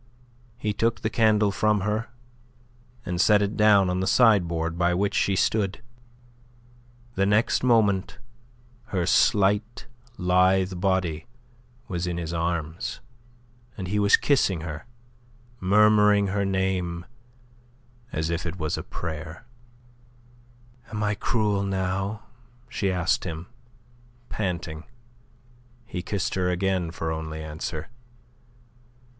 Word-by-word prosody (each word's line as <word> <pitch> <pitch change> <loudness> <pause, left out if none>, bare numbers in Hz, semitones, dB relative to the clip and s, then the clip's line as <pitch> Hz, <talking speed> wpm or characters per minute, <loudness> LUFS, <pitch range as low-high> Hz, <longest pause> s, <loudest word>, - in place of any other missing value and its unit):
He 105 -3 -2
took 115 +2 0
the 110 - -1
candle 110 -2 +3
from 105 0 +1
her, 105 +3 -1 1.0
and 90 0 -1
set 105 +2 +5
it 100 +1 -2
down 105 -3 +5
on 90 0 -1
the 95 - -1
sideboard 85 -8 +3
by 85 0 +1
which 100 +2 0
she 100 - +1
stood. 100 +1 0 1.3
The 95 -2 +1
next 105 +3 +2
moment 105 -6 +2 0.7
her 95 -8 -2
slight, 105 +6 +2 0.3
lithe 90 +1 +2
body 90 -5 0 0.6
was 90 -4 -3
in 85 -1 -2
his 85 -1 -4
arms, 85 -1 -3 0.8
and 95 -3 -5
he 105 +2 0
was 100 0 +5
kissing 100 - +1
her, 80 +5 -7 0.7
murmuring 105 0 +4
her 100 +1 0
name 95 -3 -1 1.1
as 80 +1 -2
if 85 +1 -2
it 85 +3 -5
were 75 -1 -2
a - - -4
prayer. 80 +3 -7 1.4
"Am 105 0 -3
I 105 0 +1
cruel 105 -1 0
now?" 95 +1 -2 0.4
she 100 -2 -1
asked 90 0 0
him, 80 -1 -5 0.8
panting. 85 -5 -4 1.0
He 90 -6 -5
kissed 95 +1 -2
her 90 -1 0
again 90 -1 0
for 80 -1 -4
only 80 0 -5
answer. 80 +2 -5
95 Hz, 115 wpm, -25 LUFS, 85-105 Hz, 1.4 s, set